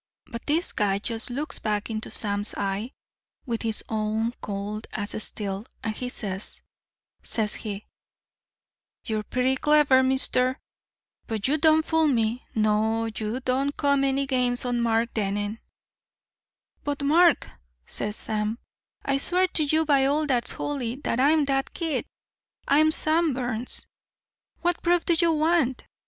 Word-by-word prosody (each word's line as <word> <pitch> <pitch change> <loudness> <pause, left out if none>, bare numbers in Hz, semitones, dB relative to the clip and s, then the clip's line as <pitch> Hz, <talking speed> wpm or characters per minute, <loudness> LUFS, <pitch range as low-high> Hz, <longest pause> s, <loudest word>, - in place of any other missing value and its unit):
"But 235 -2 -8
this 320 +4 +1
guy 200 -2 +1
just 225 +3 -2
looks 285 +6 -4
back 210 +1 -2
into 215 0 -4
Sam's 205 0 0
eye 200 +3 -2 0.6
with 235 -4 -2
his 225 -1 0
own 220 +1 -1
cold 205 +2 -5
as 205 -1 -3
steel, 200 +1 -4 0.2
and 220 -1 -2
he 250 +2 -4
says, 200 -5 -6 0.6
says 215 -2 +1
he: 210 -2 -5 1.2
'You're 215 -1 -1
pretty 255 +4 0
clever, 295 -2 +5
mister, 260 -1 +1 0.7
but 220 -2 -1
you 300 +3 +1
don't 315 0 +4
fool 320 -1 +3
me. 235 -2 +1
No, 220 +1 +2
you 220 +4 -3
don't 265 +3 0
come 280 -1 +2
any 275 0 +1
games 250 -2 0
on 245 -1 0
Mark 230 0 +1
Dennen.' 205 +1 -2 1.2
"'But, 285 -1 -2
Mark,' 330 +3 +4 0.3
says 210 0 -2
Sam, 215 0 -2 0.5
'I 275 -1 +2
swear 365 +5 +2
to 310 - +2
you 315 +2 +2
by 280 -3 +4
all 300 +2 +1
that's 250 -5 0
holy 255 -5 -3
that 235 - 0
I'm 295 +3 +4
that 270 -1 -1
kid 325 -3 -2 0.6
I'm 310 +3 +5
Sam 315 -2 +2
Burns. 245 -1 0 0.8
What 350 0 0
proof 350 0 +2
do 345 - +3
you 335 0 +3
want? 310 -5 +1
250 Hz, 145 wpm, -26 LUFS, 215-290 Hz, 1.2 s, clever